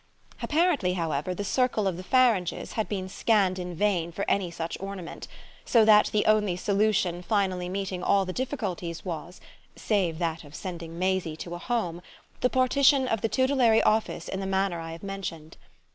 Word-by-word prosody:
Apparently, 305 - +2
however, 165 0 -2
the 205 - -3
circle 225 -1 +1
of 185 - -1
the 180 - -7
Faranges 230 -6 +2
had 220 - -2
been 190 -3 -3
scanned 190 -2 +1
in 180 -1 -5
vain 175 -3 0
for 200 +4 -3
any 195 -3 +1
such 165 0 -5
ornament; 195 -3 -7 0.4
so 230 -3 +4
that 210 -1 +6
the 210 - +1
only 210 -4 +3
solution 200 -2 +1
finally 185 -2 0
meeting 190 -1 -3
all 195 +1 +2
the 185 - -4
difficulties 195 - -4
was, 175 0 -6 0.4
save 185 -7 0
that 165 -1 -2
of 145 0 -13
sending 170 -2 -7
Maisie 185 -3 -1
to 170 +1 -7
a 175 - -5
Home, 180 -7 -2 0.4
the 250 - +2
partition 265 +1 +3
of 225 -4 -1
the 225 - 0
tutelary 260 -4 +3
office 215 -5 +1
in 190 - -4
the 195 - -3
manner 190 -2 0
I 165 0 -6
have 165 - -11
mentioned. 190 -6 -6
190 Hz, 175 wpm, -27 LUFS, 175-215 Hz, 0.4 s, that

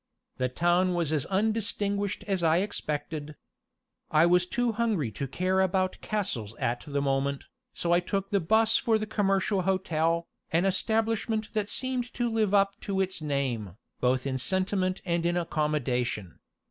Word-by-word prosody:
The 130 0 0
town 175 +6 +2
was 165 -3 0
as 150 -4 0
undistinguished 205 -1 -1
as 195 -3 0
I 165 0 +4
expected. 150 -5 -3 0.7
I 155 +1 +5
was 180 +1 +3
too 245 +4 0
hungry 215 - 0
to 135 +6 -4
care 185 +7 +1
about 185 0 0
castles 140 - -2
at 120 +1 -2
the 140 -1 -1
moment, 135 0 0 0.3
so 170 - -1
I 175 - +5
took 195 +2 -3
the 200 - +3
'bus 220 +6 +3
for 225 -2 +2
the 215 - -3
Commercial 195 -2 +1
Hotel, 170 -3 +1 0.3
an 170 +3 +2
establishment 220 +2 0
that 210 -1 -1
seemed 255 -1 -2
to 240 -1 0
live 220 -3 +1
up 200 -1 +4
to 195 -1 -2
its 190 -3 0
name, 130 - -2 0.2
both 125 +1 +1
in 130 -1 -1
sentiment 185 +5 0
and 170 -1 0
in 175 +1 +1
accommodation. 130 - -1
185 Hz, 160 wpm, -28 LUFS, 150-205 Hz, 0.7 s, I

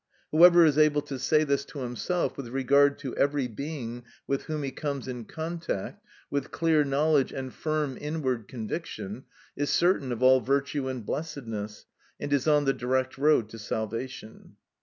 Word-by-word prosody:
Whoever 170 +1 +8
is 150 -1 +3
able 150 -1 +4
to 140 -3 -6
say 155 +4 +3
this 140 -2 0
to 140 - -8
himself, 125 - -2
with 135 -3 -6
regard 140 +3 +3
to 135 -4 -5
every 140 -2 +1
being 120 -1 -6 0.2
with 140 0 -2
whom 155 -2 -3
he 135 - -3
comes 140 -1 -4
in 125 -3 -5
contact, 165 - -5 0.3
with 140 0 -2
clear 160 -2 +2
knowledge 145 0 +2
and 130 -1 -5
firm 155 -4 -2
inward 130 -8 -2
conviction, 115 - -6 0.3
is 145 0 -1
certain 170 -7 +2
of 120 +1 -2
all 130 0 +7
virtue 140 +2 0
and 130 -4 -4
blessedness, 115 -9 -5 0.3
and 145 0 -2
is 140 +1 +1
on 150 -1 +4
the 135 - +3
direct 130 +1 -1
road 145 -6 +4
to 115 - -10
salvation. 110 +1 -5
140 Hz, 165 wpm, -28 LUFS, 125-150 Hz, 0.3 s, Whoever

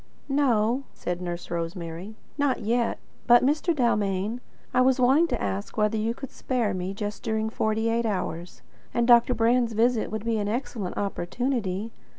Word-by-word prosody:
"No," 250 -3 +2
said 175 0 -4
Nurse 175 -1 -5
Rosemary, 170 +3 -5 0.2
"not 285 -4 +1
yet. 230 +2 0 0.3
But, 240 +1 +7
Mr. 305 +5 +2
Dalmain, 210 -3 0 0.3
I 250 - +4
was 260 0 +3
wanting 270 +7 +5
to - - -2
ask 100 0 -3
whether 210 +1 +2
you 220 +2 -1
could 270 - -8
spare 240 -6 -1
me 185 0 -3
just 205 +1 -5
during 220 -1 -1
forty 220 0 0
eight 230 0 +1
hours; 180 -4 -4 0.3
and 235 0 +2
Dr. 240 0 +6
Brand's 235 0 +2
visit 230 +1 +2
would 220 0 -4
be 230 -1 +1
an 205 - -1
excellent 230 -5 -3
opportunity. 205 +1 -2
225 Hz, 165 wpm, -26 LUFS, 195-245 Hz, 0.3 s, But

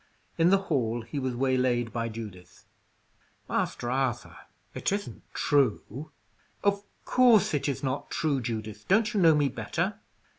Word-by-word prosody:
In 165 +1 +5
the 195 - +6
hall 120 -11 -1
he 130 +5 -5
was 130 -2 -2
waylaid 125 -2 +1
by 115 -1 -2
Judith. 105 -5 -10 0.8
"Master 120 - -1
Arthur, 130 -2 -1 0.4
it - - -1
isn't 200 0 -3
true?" 140 0 +1 0.5
"Of 200 0 +2 0.2
course 225 -6 +5
it 145 0 0
is 140 - -3
not 135 0 -2
true, 150 -5 0
Judith. 110 -3 -5
Don't 215 +4 +3
you 205 - +2
know 165 -3 +6
me 145 -1 +3
better?" 120 -5 -2
135 Hz, 145 wpm, -28 LUFS, 115-165 Hz, 0.8 s, the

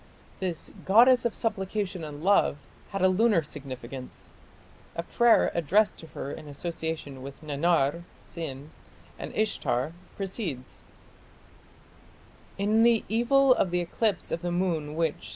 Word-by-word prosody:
This 180 -4 -4
"goddess 245 +5 +6
of 235 - 0
supplication 200 -4 -2
and 150 0 -7
love" 195 -6 +4 0.3
had 195 -2 -2
a - - +7
lunar 195 -2 +3
significance. 130 -3 -8 0.6
A 170 - -2
prayer 235 +6 +4
addressed 190 +5 +2
to 160 - -11
her 140 - -4
in 150 - -8
association 155 -2 -5
with 140 +3 -10
Nannar 155 +1 +1 0.2
(Sin) 150 -3 -7 0.5
and - - -5
Ishtar, 160 - 0 0.2
proceeds: 185 - -5 1.8
In 210 +3 +2
the 230 -1 +4
evil 255 +4 +4
of 195 - +1
the 180 0 0
eclipse 195 +3 -1
of 165 - -2
the 175 - -2
moon 165 -4 -1
which 155 -10 -1
175 Hz, 130 wpm, -27 LUFS, 150-210 Hz, 1.8 s, a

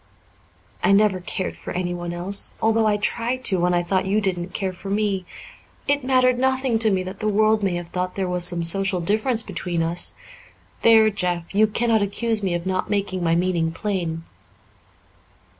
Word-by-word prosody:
I 200 - +4
never 200 -2 +3
cared 180 +1 -5
for - - -8
anyone 175 -1 -3
else 180 +3 +1
although 225 0 +2
I 210 -1 +2
tried 240 +4 -1
to, 190 -3 +2
when 175 +1 +2
I 175 - +1
thought 190 +2 -1
you 205 +2 +2
didn't 180 -4 -2
care 190 0 -3
for 195 +2 -9
me. 200 -3 -1 0.6
It 285 -1 +1
mattered 255 -1 +2
nothing 260 -2 +1
to 220 -1 +2
me 190 -2 0
that 185 +1 -8
the 215 - -2
world 215 +1 +2
may 190 -3 0
have 175 -1 -6
thought 180 0 -3
there 190 -2 -2
was 180 -1 0
some 175 -1 +2
social 190 +2 +4
difference 220 +6 0
between 175 -4 -3
us. 170 +2 -1 0.6
There, 220 -1 +5
Jeff, 180 -3 -3
you 215 +2 +4
cannot 225 0 +1
accuse 220 +2 -1
me 185 -3 -1
of 170 0 -4
not 185 0 -2
making 195 -3 -2
my 165 -1 +2
meaning 170 -2 0
plain." 170 -4 -3
195 Hz, 185 wpm, -22 LUFS, 175-215 Hz, 0.6 s, There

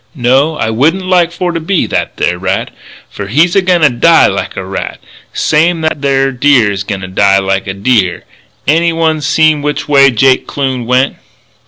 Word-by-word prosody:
No, 135 +4 +1
I 110 - -2
wouldn't 160 +11 0
like 180 -2 +2
for 175 0 -3
to 165 - -3
be 175 +2 -1
that - - -3
there 90 0 -1
rat. 95 0 -2 0.4
Fer 100 - -7
he's 155 - +1
a 195 - +4
goin' 180 -2 +1
to 150 -3 +4
die 165 +7 +4
like - - -3
a - - -5
rat, - - -6 0.3
same's 165 +2 0
that 150 -2 -3
there 135 -1 +1
deer 125 -4 +2
is 95 -1 -4
a 95 - -8
goin' 100 -3 -4
to 95 - -6
die 95 +1 +2
like 95 0 -2
a 95 - -3
deer.... 100 -3 0 0.4
Anyone 165 +1 +1
seen 155 +1 +2
which 150 0 -3
way 140 -2 +5
Jake 130 +2 +1
Kloon 130 -4 -3
went?" 130 +2 +1
140 Hz, 195 wpm, -11 LUFS, 110-160 Hz, 0.4 s, way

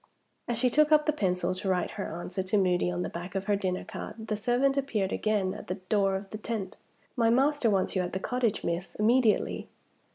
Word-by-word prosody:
As 240 - -1
she 250 +1 +2
took 305 +3 +4
up 300 -1 +5
the 305 - +2
pencil 185 -8 0
to 185 +1 -3
write 180 -1 0
her 165 - -5
answer 185 +2 -3
to 190 +3 0
Moody 180 -2 +2
on 175 0 -2
the - - -2
back 175 +3 -7
of 195 - -1
her 205 +1 +1
dinner 185 -2 -2
card, 220 +2 -8
the 215 - +1
servant 245 +6 +2
appeared 230 -9 -1
again 205 -3 0
at - - -9
the 185 - -2
door 195 +1 +1
of 195 0 -6
the 215 - -6
tent. 215 -4 -4 0.4
"My 230 -3 +3
master 270 +1 +3
wants 195 -2 +1
you 185 - +2
at 180 0 -4
the 190 - -1
cottage, 245 0 -1
miss, 170 +2 -3
immediately." 225 +1 +2
205 Hz, 225 wpm, -29 LUFS, 185-240 Hz, 0.4 s, up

